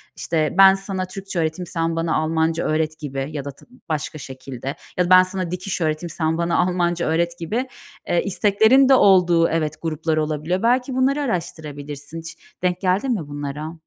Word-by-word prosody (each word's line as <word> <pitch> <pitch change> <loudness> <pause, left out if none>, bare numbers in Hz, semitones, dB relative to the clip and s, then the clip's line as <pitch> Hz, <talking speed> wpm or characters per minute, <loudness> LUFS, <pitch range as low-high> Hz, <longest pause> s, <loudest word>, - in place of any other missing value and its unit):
İşte, 155 -2 -1
"Ben 195 0 +8
sana 195 -1 -3
Türkçe 190 -1 -6
öğreteyim, 160 +2 -2
sen 165 0 -1
bana 165 0 0
Almanca 160 +1 0
öğret," 155 0 -1
gibi 135 -2 -4
ya 145 -3 -5
da 140 - -4
tı 140 - -20 0.2
başka 155 0 -3
şekilde, 130 -1 -7 0.2
ya 180 - +3
da - - -4
"Ben 185 0 +8
sana 185 -2 -4
dikiş 180 +1 -4
öğreteyim, 155 +2 -1
sen 160 0 -1
bana 170 0 0
Almanca 175 -1 +1
öğret," 170 +2 0
gibi, 225 +10 -2 0.4
eee, 175 - +1
isteklerin 220 +7 +4
de - - +7
olduğu 180 -7 +5
Evet, 155 -2 -1
gruplar 160 -1 -1
olabiliyor. 155 +5 -1
Belki 250 +3 +2
bunları 270 +3 +2
araştırabilirsin. 150 - -5
Hiç 165 0 -9 0.3
denk 180 0 0
geldin 195 +7 +1
mi 170 -10 -4
bunlara? 145 +2 -5
165 Hz, 175 wpm, -21 LUFS, 155-185 Hz, 0.4 s, Ben